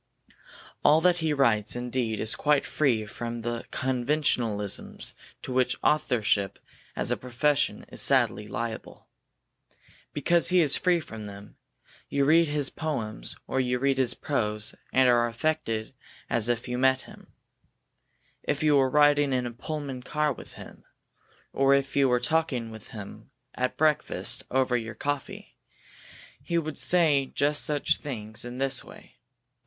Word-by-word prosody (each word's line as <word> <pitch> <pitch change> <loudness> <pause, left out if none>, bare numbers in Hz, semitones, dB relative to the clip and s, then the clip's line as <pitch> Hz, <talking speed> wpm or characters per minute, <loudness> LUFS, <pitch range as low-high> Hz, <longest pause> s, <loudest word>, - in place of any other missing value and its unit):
All 155 +2 +6
that 180 0 +4
he 160 -2 0
writes 115 -8 +2
indeed 120 -3 -2
is 110 - +2
quite 150 -1 +2
free 120 -8 +1
from 115 +2 -6
the 120 0 -4
conventionalisms 125 -6 -1 0.3
to 130 - -5
which 125 0 +2
authorship 115 -10 +1 0.4
as - - 0
a - - +2
profession 135 +4 0
is - - -4
sadly 105 - +2
liable. 115 +1 -6 1.1
Because 170 -1 +2
he 180 +1 +4
is 150 -5 +4
free 180 -2 +2
from 110 -8 -8
them, 100 0 -11 0.5
you 140 -1 +1
read 165 +3 +5
his 145 -2 +1
poems 130 -10 -4
or 130 - -2
you 125 -1 +1
read 135 +1 +1
his 125 -2 +4
prose, 105 -6 -2 0.2
and 130 -1 +4
are 120 -1 +4
affected 115 -3 -2 0.4
as 120 -1 +2
if 120 +1 -1
you 125 0 -3
met 130 0 +3
him. - - -15 1.1
If 150 +1 -2
you 150 -2 +4
were 135 -1 +3
riding 145 0 +4
in 125 -1 0
a 120 - -4
Pullman 140 +1 -5
car 150 +3 0
with - - -12
him, - - -12 0.7
or 135 0 +4
if 140 0 -1
you 140 -2 +4
were 125 0 +3
talking 125 -4 -1
with 110 -1 -11
him 105 -3 -10 0.2
at 125 0 -2
breakfast 155 -1 +1
over 130 -1 +1
your 115 -2 -3
coffee, 145 +3 -5 0.8
he 170 - -2
would 155 -2 -3
say 155 -6 +3
just 145 +1 +4
such 150 -2 +2
things 110 -6 -6
in 120 0 -7
just 135 0 0
this - - -4
way. - - -15
130 Hz, 150 wpm, -27 LUFS, 115-145 Hz, 1.1 s, All